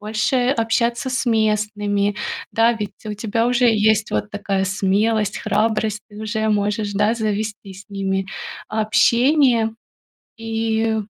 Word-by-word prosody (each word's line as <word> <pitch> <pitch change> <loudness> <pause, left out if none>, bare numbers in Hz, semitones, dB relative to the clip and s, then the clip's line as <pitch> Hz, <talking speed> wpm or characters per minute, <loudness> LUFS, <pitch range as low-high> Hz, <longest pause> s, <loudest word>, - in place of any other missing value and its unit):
больше 220 +4 0
общаться 235 +1 0
с 255 0 -1
местными. 210 -2 +1 0.3
Да, 230 +1 +3
ведь 215 -3 -5
у 210 - -3
тебя 225 +2 -1
уже 245 0 +3
есть 220 0 +2
вот 210 - -2
такая 200 -2 -1
смелость, 200 +3 +1
храбрость, 215 0 0
ты 205 - -13
уже 220 0 -1
можешь, 205 0 0
да, 210 +3 +2
завести 215 -2 -3
с 195 +1 -12
ними 195 -1 -2 0.4
общение 235 +2 +3 0.7
и, 225 0 -1
215 Hz, 125 wpm, -20 LUFS, 205-225 Hz, 0.7 s, Да